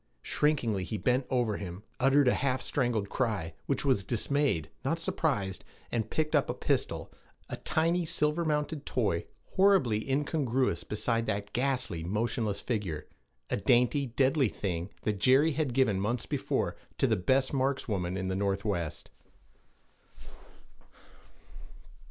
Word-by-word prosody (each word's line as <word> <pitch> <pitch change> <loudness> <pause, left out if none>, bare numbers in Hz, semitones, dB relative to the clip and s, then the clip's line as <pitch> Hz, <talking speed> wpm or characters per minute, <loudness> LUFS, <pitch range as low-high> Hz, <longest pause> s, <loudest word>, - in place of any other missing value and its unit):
Shrinkingly 120 -10 +1
he 110 +4 -3
bent 125 +6 +1
over 120 -5 +1
him, 95 0 -7 0.2
uttered 135 +1 +4
a - - +5
half 130 -1 0
strangled 120 -7 0
cry, 105 -9 -1
which 140 - 0
was 130 -8 +3
dismayed, 120 - 0
not - - 0
surprised, 95 -2 -1 0.3
and 110 -2 -1
picked 155 -1 -1
up - - +2
a - - -1
pistol, - - -1 0.4
a - - -4
tiny 165 +3 +1
silver 155 0 +1
mounted 150 -1 -1
toy, 100 -12 -1 0.2
horribly 175 - +3
incongruous 135 - 0
beside 115 +4 -1
that 100 -1 -2
ghastly, 125 -10 -1
motionless 105 +2 -1
figure 95 -10 -3 0.5
a - - +1
dainty, 125 +5 +3
deadly 130 +1 +2
thing 90 -3 -3
that 105 -2 -1
Jerry 135 +8 +5
had 150 -2 -1
given 120 -6 +2
months 110 +4 -1
before - - -1 0.2
to - - +2
the 115 -4 +3
'best 130 +9 +1
markswoman 110 -10 -1
in 95 0 -2
the 95 - -1
Northwest.' 100 -4 -2
120 Hz, 135 wpm, -30 LUFS, 100-140 Hz, 0.5 s, a